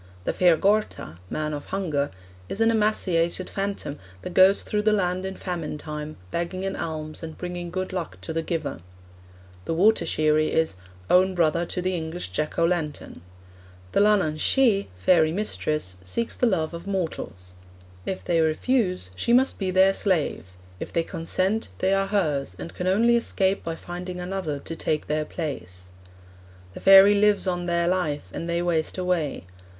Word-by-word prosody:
'The - - -1
Fear 175 -3 +4
Gorta 200 - 0
(Man 155 0 -2
of 145 -1 -5
Hunger) 155 -7 -1 0.4
is 195 - -4
an 225 0 +4
emaciated 185 -5 +1
phantom 195 -7 -3 0.2
that 180 - -6
goes 190 +2 +6
through 210 - -1
the 215 +1 +3
land 185 -2 0
in 190 - -6
famine 170 -6 -4
time, 150 0 -6
begging 180 +3 -3
an 195 - -2
alms 155 -1 -5
and 160 -1 -7
bringing 175 -1 -5
good 185 +2 -4
luck 180 -3 -4
to 160 - -3
the 165 - 0
giver.' 160 - -3 0.9
The 165 - -1
Water 210 +6 +4
sheerie 155 0 +2
is 160 -6 +1 0.3
'own 185 - +4
brother 170 0 +2
to 180 - -3
the 185 0 0
English 160 - -4
Jack 120 +12 -3
o' 170 - +4
Lantern.' 165 - -2 0.7
'The - - +2
Leanhaun 200 -7 +3
Shee 230 -5 +3
(fairy 160 - +3
mistress) 155 - -2
seeks 160 - -2
the 250 - +2
love 170 -6 0
of 170 +3 -8
mortals. 160 - -4 0.5
If 190 - -4
they 165 -2 +2
refuse, 180 - +1
she 235 - 0
must 260 +2 +3
be 190 -2 -1
their 190 +1 +5
slave; 180 - 0 0.3
if - - -6
they 165 - +1
consent, 185 +5 -1
they 190 +1 +1
are 195 0 +1
hers, 155 -9 0
and 170 - -7
can 180 - -3
only 230 +6 +4
escape 195 -4 0
by 165 0 -3
finding 180 +2 -7
another 180 -5 -3
to 165 - -6
take 155 -1 -1
their 155 +1 -1
place. 90 - -6 0.8
The - - -8
fairy 195 +1 +8
lives 205 0 +3
on 175 -1 -1
their 170 0 +1
life, 165 - -1
and 170 - -5
they 170 0 0
waste 165 -1 0
away. 180 - -1
175 Hz, 170 wpm, -25 LUFS, 155-195 Hz, 0.9 s, fairy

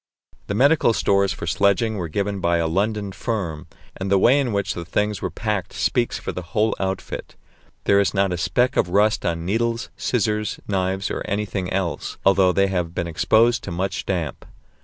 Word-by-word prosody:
The 100 - -2
medical 140 0 +4
stores 100 -2 +2
for - - -5
sledging 100 +5 +2
were 90 -3 -3
given 100 +4 -2
by 85 -1 +2
a 85 - 0
London 100 +4 -1
firm, 90 -7 -4 0.3
and 95 0 -4
the 100 - +4
way 125 +8 +5
in 130 -4 0
which 100 -1 -1
the 85 - -5
things 105 +4 -1
were - - -2
packed 105 -5 -3
speaks 120 -2 0
for - - -5
the 90 - -5
whole 105 +6 0
outfit. 95 -1 -4 0.5
There 100 - +4
is 100 - +2
not 100 -2 +1
a - - -2
speck 125 +9 +1
of 90 - +2
rust 105 +1 +2
on 85 -1 -2
needles, 115 +4 -1
scissors, 105 -3 -1
knives, 95 0 -1
or - - -3
anything 100 -3 -2
else, 95 -3 -2
although 95 -1 +5
they 100 +2 +3
have 90 -3 -2
been 90 - -1
exposed 115 +8 +2
to - - -5
much 95 +3 -3
damp. 85 -7 -2
100 Hz, 190 wpm, -22 LUFS, 90-105 Hz, 0.5 s, way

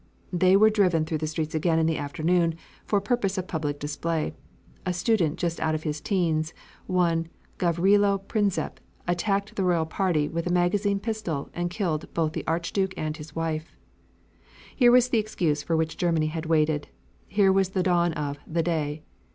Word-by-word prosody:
They 185 +2 +5
were 215 +2 +6
driven 180 -7 +2
through 155 -1 -2
the 155 - -2
streets 155 0 -3
again 160 +1 +1
in 160 - +3
the 160 -1 0
afternoon, 165 +3 +1 0.3
for 205 - +2
purpose 205 -2 0
of 185 -1 -3
public 150 -5 -3
display. 155 +2 -2 0.5
A 180 - -1
student, 180 -4 +1
just 170 -1 -2
out 160 0 +1
of 155 - -4
his 150 -1 -3
'teens, 165 -5 0 0.3
one 170 -3 +1 0.3
Gavrilo 195 +4 +3
Prinzep, 200 0 -1 0.3
attacked 195 +3 0
the 195 - 0
royal 175 -3 +2
party 160 -3 0
with 170 +2 -3
a - - 0
magazine 195 +3 +2
pistol 200 -10 -3
and 175 0 -2
killed 175 -5 -2
both 160 -2 +1
the - - -5
Archduke 175 +4 -1
and 155 0 -3
his 150 -2 -11
wife. 160 -1 -3 1.0
Here 245 -2 +6
was 250 0 +5
the 235 - +3
excuse 170 -8 0
for 165 +2 0
which 160 0 -1
Germany 165 -3 +1
had 160 -1 -4
waited. 155 -2 +2 0.4
Here 200 -1 +3
was 190 -1 +2
the 190 -1 0
dawn 175 -1 +2
of 145 -2 -3
"The 165 +1 0
Day." 155 -2 -2
170 Hz, 175 wpm, -26 LUFS, 155-190 Hz, 1.0 s, were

